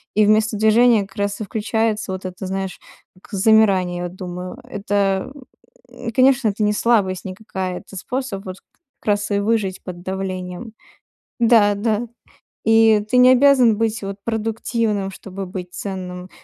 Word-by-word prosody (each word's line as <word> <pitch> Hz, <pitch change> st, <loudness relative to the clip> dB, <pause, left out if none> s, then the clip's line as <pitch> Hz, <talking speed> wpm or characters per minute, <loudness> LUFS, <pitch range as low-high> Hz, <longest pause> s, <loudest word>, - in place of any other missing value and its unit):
И 215 Hz, 0 st, +5 dB
вместо 215 Hz, +1 st, +2 dB
движения 220 Hz, +1 st, +4 dB
как 195 Hz, -, -21 dB
раз 200 Hz, +1 st, -2 dB
и -, -, -3 dB
включается 220 Hz, 0 st, -1 dB
вот 185 Hz, 0 st, -7 dB
это, 185 Hz, +1 st, -6 dB
знаешь, 190 Hz, 0 st, -4 dB, 0.4 s
как -, -, -19 dB
замирание, 195 Hz, -3 st, +3 dB
я 175 Hz, -, -3 dB
думаю, 180 Hz, +2 st, -7 dB
это, 200 Hz, -2 st, -1 dB, 0.6 s
м, 235 Hz, -2 st, -7 dB
конечно, 260 Hz, -1 st, +4 dB
это 210 Hz, +1 st, -2 dB
не 210 Hz, -, +2 dB
слабость 205 Hz, -4 st, +1 dB
никакая, 185 Hz, -2 st, -5 dB
это 195 Hz, -, -13 dB
способ 230 Hz, 0 st, -4 dB
вот 185 Hz, 0 st, -6 dB, 0.4 s
как -, -, -24 dB
раз 205 Hz, +1 st, -4 dB
и 200 Hz, -, +2 dB
выжить 205 Hz, -3 st, -1 dB
под 175 Hz, -2 st, -8 dB
давлением. 185 Hz, +2 st, -5 dB, 0.7 s
Да, 225 Hz, -3 st, +5 dB
да. 220 Hz, +2 st, -1 dB, 0.6 s
И 225 Hz, -1 st, +5 dB
ты 250 Hz, -, +2 dB
не 250 Hz, 0 st, +7 dB
обязан 255 Hz, -4 st, +5 dB
быть 225 Hz, 0 st, -1 dB
вот 195 Hz, 0 st, -5 dB
продуктивным, 225 Hz, -2 st, -1 dB
чтобы 195 Hz, 0 st, -8 dB
быть 180 Hz, -1 st, -7 dB
ценным. 185 Hz, -2 st, -6 dB
205 Hz, 155 wpm, -20 LUFS, 190-225 Hz, 0.7 s, не